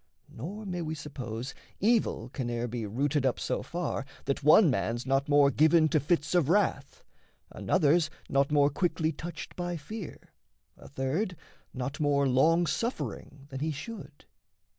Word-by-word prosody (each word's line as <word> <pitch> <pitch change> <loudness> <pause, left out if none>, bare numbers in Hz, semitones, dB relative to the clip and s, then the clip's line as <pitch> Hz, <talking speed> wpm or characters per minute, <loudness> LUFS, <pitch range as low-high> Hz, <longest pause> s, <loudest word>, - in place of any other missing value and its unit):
Nor 195 - -7
may 180 -2 -3
we 160 -1 -3
suppose 130 -4 -6 0.3
Evil 215 - +1
can 125 -1 -4
e'er 120 0 -2
be 115 -2 -4
rooted 140 +6 0
up 130 -2 +1
so - - -2
far 170 -5 -3 0.2
That 140 - -1
one 155 +3 +7
man's 115 +2 -1
not 135 +2 +1
more 145 -1 +5
given 155 +3 +4
to 155 - +3
fits 150 +2 0
of 170 -5 +3
wrath, 205 - 0 0.5
Another's 165 -2 +2 0.2
not 140 +1 +1
more 145 -1 +4
quickly 160 0 0
touched 165 +2 -8
by 175 -1 -3
fear, 190 +4 -9 0.4
A - - -14
third 150 +9 -2 0.4
not 135 +2 -5
more 140 -2 +2
long 160 +7 +4
suffering 155 - -4
than 135 -2 -6
he 155 +3 -1
should. 155 -1 -9
150 Hz, 155 wpm, -29 LUFS, 135-175 Hz, 0.5 s, one